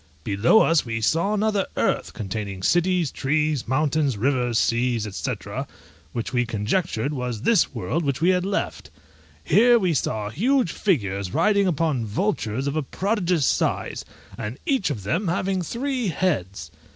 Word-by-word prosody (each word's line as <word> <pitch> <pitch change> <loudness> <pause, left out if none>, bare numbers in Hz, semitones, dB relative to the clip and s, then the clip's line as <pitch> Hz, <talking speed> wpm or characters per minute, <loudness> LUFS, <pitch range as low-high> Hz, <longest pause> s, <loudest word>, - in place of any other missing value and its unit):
Below 105 - +4
us 165 -1 +3
we 115 -2 -3
saw 170 - +1
another 210 -2 +1
earth, - - 0
containing 100 -1 -5
cities, 175 - +2
trees, 150 -1 0
mountains, 145 -1 +1
rivers, 125 0 +1
seas, 120 -1 +1
&c., - - -2 0.8
which 115 +2 -4
we 120 -1 +2
conjectured 115 - -1
was 125 -4 -4
this 230 -3 +3
world 170 - -2
which 140 -2 -1
we 170 +3 +3
had 180 -1 +2
left. 190 - -3 0.5
Here 235 +8 +5
we 185 -6 +1
saw 105 -7 -2
huge 240 - +1
figures 100 - -1
riding 200 -2 +3
upon 155 -7 0
vultures 130 - -1
of 140 +1 -2
a 155 - +1
prodigious 180 - 0
size, - - 0 0.4
and 105 +5 -5
each 265 - +1
of 115 -9 -4
them 165 - -1
having 185 +2 0
three 250 - -2
heads. 100 - -2
150 Hz, 150 wpm, -24 LUFS, 115-185 Hz, 0.8 s, Here